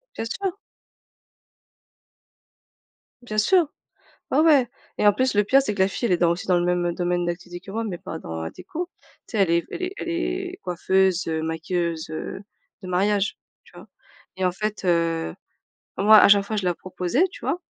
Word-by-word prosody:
Bien 225 - -3
sûr! 375 - -3 2.7
Bien 215 -3 -5
sûr. 350 - +4 0.6
Ouais, 270 - +2
ouais 295 -6 +5 0.3
et - - +1
en 205 - +8
plus, 255 +3 0
le 205 0 +3
pire, 270 +7 +5
c'est 215 -7 -2
que 195 - -5
la 190 - +4
fille, 235 - -2
elle 185 - +1
est - - +4
dans 170 -1 +3
aussi 170 +1 -2
dans 180 -1 +3
le 175 - 0
même 175 -1 0
domaine 175 0 0
d'activité 175 0 -5
que - - -8
moi 225 +3 -2
mais 190 -6 -4
pas 160 - -7
dans 80 - -6
la 80 - -4
déco. 315 - -6 0.4
Tu 220 - -6
sais - - 0
elle 195 -4 +3
est 170 0 +2
elle 365 - -6
est 365 +1 -2
elle - - -5
est 360 +2 -2
coiffeuse, 190 +1 +1
heu, 160 -1 -1
maquilleuse, 165 0 -2
heu, 155 +4 -5 0.4
de 185 - -7
mariage, 200 +3 +1 0.3
tu - - -21
vois? - - -12 0.5
Et 190 - -1
en 180 - +1
fait, 210 +2 -4
heu, 165 - +1 0.6
moi, 215 +2 +7
à - - +7
chaque 200 0 +6
fois 215 +1 -3
je 200 - -1
la 175 -1 +1
proposais, 185 - 0
tu - - -11
vois? 275 +8 -1
190 Hz, 205 wpm, -24 LUFS, 175-230 Hz, 2.7 s, en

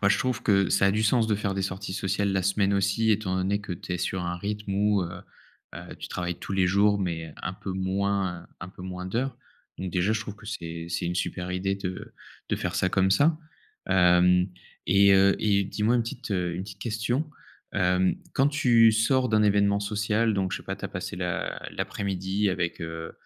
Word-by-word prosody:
Moi 100 - +4
je - - +4
trouve 125 -2 -1
que, 100 -3 +3
ça 100 - +4
a - - +4
du 110 +1 +1
sens 110 +1 +3
de 105 - +1
faire 100 -1 -2
des 95 - -1
sorties 95 0 -4
sociales 100 +1 0
la 95 -1 +1
semaine 100 +1 +2
aussi, 100 +3 +2
étant 105 -3 +1
donné 95 +2 0
que 100 - -6
tu 90 +1 -6
es 90 - -2
sur 90 +1 -2
un 85 0 -2
rythme 105 +2 -4
où, 105 0 +2
heu, 85 - -7 0.5
bah, - - -9
tu - - -7
travailles 90 -1 -3
tous - - -6
les 95 -1 +3
jours 100 +2 +3
mais 80 -4 -3
un - - -3
peu 95 - -6
moins, 95 -1 -1
heu, - - -17
un 85 - -6
peu 95 - -12
moins 90 0 -6
d'heures. 125 +8 -2 0.4
Donc 95 -1 -4
déjà, 90 +4 +1
je 110 - -1
trouve 105 -1 -7
que 110 - -15
c'est 85 -5 -5
c'est 85 +1 -2
une 90 - -2
super 90 0 -3
idée 95 +2 -1
de 95 -2 -6 0.4
de - - 0
faire - - -3
ça 95 - +2
comme 95 0 +2
ça, 150 +11 +4 0.5
hem 90 -1 +5 0.4
et 100 +1 +6
heu 95 0 +5
et 100 -2 +2
dis 100 +2 -5
moi 115 +3 +4
une 120 - +2
petite, 120 +1 -7
heu, 90 -3 -1
une 90 - -3
petite 95 -1 -10
question. 120 +7 -1 0.4
Hem, 90 -1 +2 0.2
quand 135 - +4
tu 120 -6 +5
sors 125 +4 +2
d'un 110 -2 +3
événement 100 -1 +3
social, 105 +2 0
donc 95 -2 -1
je - - -1
sais - - -13
pas - - -5
tu - - -9
as - - -2
passé - - -5
l'a 90 -1 -3
l'après - - -4
midi 95 +1 0
avec, 90 -1 -2
heu, 80 -1 -6
100 Hz, 225 wpm, -26 LUFS, 90-105 Hz, 0.5 s, et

